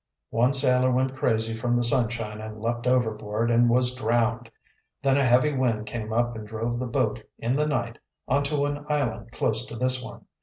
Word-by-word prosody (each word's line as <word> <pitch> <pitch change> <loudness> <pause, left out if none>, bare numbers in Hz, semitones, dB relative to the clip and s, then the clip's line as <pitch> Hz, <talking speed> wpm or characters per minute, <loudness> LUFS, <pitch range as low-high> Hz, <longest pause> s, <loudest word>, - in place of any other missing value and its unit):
"One 125 +4 +2
sailor 130 -2 +3
went 130 +1 0
crazy 110 -3 0
from 120 +2 0
the 120 - +2
sunshine 115 -3 0
and 110 0 -8
leaped 120 +2 -2
overboard, 110 -2 0
and 120 +1 +4
was 125 +1 +3
drowned. 120 0 0 0.5
Then 135 -1 +3
a 140 - +3
heavy 130 +4 +4
wind 115 -5 0
came 110 0 -5
up 120 +1 0
and 110 -1 -7
drove 115 +2 -3
the 130 - -3
boat, 115 -3 0 0.2
in 115 +2 -1
the 150 +1 +1
night, 120 -6 -2 0.3
onto 145 +1 +1
an 145 0 -3
island 115 -6 -1
close 115 -1 0
to - - -8
this 130 +1 +1
one. 130 - -10
120 Hz, 190 wpm, -26 LUFS, 115-130 Hz, 0.5 s, and